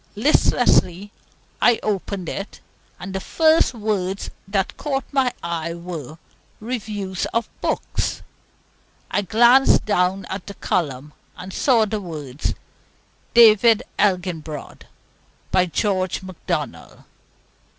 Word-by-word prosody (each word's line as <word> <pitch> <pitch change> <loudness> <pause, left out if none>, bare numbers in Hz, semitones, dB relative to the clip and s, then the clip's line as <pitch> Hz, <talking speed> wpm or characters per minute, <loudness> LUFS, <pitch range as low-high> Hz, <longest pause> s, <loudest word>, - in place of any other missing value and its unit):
Listlessly 205 - +2 0.5
I 240 -2 +5
opened 200 -3 -2
it, 195 +4 -6 0.4
and 190 +1 -7
the 190 - -2
first 315 - +3
words 200 -3 -2 0.2
that 195 -1 -1
caught 275 -2 -2
my 265 -3 +2
eyes 170 -1 -3
were 165 -4 -7 0.4
"Reviews 210 -5 -4
of 230 - +1
Books." - - -2 0.9
I - - +1
glanced 235 +7 +5
down 190 -2 +1 0.2
the 200 - -8
column, 150 -5 -2 0.2
and 185 +1 -8
saw 235 -5 +3
the 215 0 -3
words, 150 -6 -5 0.8
"David 225 -1 +7 0.2
Elginbrod," 175 -6 -2 0.6
by 185 -1 +3
George 185 0 -1
Macdonald. 185 -2 -5
195 Hz, 100 wpm, -22 LUFS, 180-220 Hz, 0.9 s, David